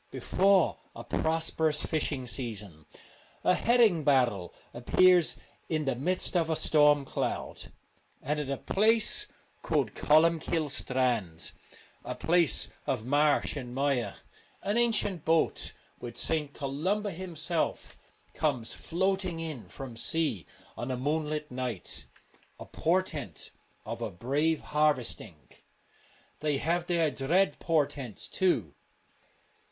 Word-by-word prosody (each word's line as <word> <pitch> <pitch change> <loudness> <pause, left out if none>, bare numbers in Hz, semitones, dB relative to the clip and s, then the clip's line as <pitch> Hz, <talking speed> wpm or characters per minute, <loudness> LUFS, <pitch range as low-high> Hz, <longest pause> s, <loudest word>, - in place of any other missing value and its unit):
Before 195 -2 +2 0.2
a 115 - -7
prosperous 160 +2 +1
fishing 145 -4 -1
season 105 - -6 0.6
a - - +4
herring 225 -8 +3
barrel 125 -10 +2 0.2
appears 175 +8 +4 0.3
in 155 -2 0
the 135 - +1
midst 180 +9 0
of 165 -2 +2
a 160 - +1
storm 150 -2 +4
cloud; - - -4 0.5
and 150 +3 -2
at 145 -2 -4
a 140 - -1
place 225 - +2 0.3
called - - 0
Colum 160 +2 +4
kille's 155 -3 -1
Strand, 115 -11 -1 0.5
a - - -5
place 170 -2 +3 0.2
of 115 -4 -1
marsh 145 +3 +2
and 125 -3 -6
mire, 135 -3 0 0.5
an 205 +2 0
ancient 220 -8 +1
boat, 160 0 +1 0.3
with 120 - -8
St. 155 -3 0
Columba 175 +10 -2
him 180 -1 -7
self, 165 +1 -2 0.4
comes 130 -7 -1
floating 190 -1 -1
in 150 - -6
from 130 +3 -8
sea 135 - -1 0.3
on 120 - -5
a 130 - -2
moon 150 +4 -1
light 150 -1 -4
night: 125 -6 -4 0.5
a - - -8
portent 160 - -2 0.3
of - - -5
a - - -2
brave 145 - 0
harvest 150 -5 +1
ing. - - -12 1.0
They 150 -2 0
have 170 +4 -1
their 165 -3 +2
dread 155 +5 +1
portents 145 - -1
too. 120 - 0
150 Hz, 125 wpm, -29 LUFS, 130-170 Hz, 1.0 s, a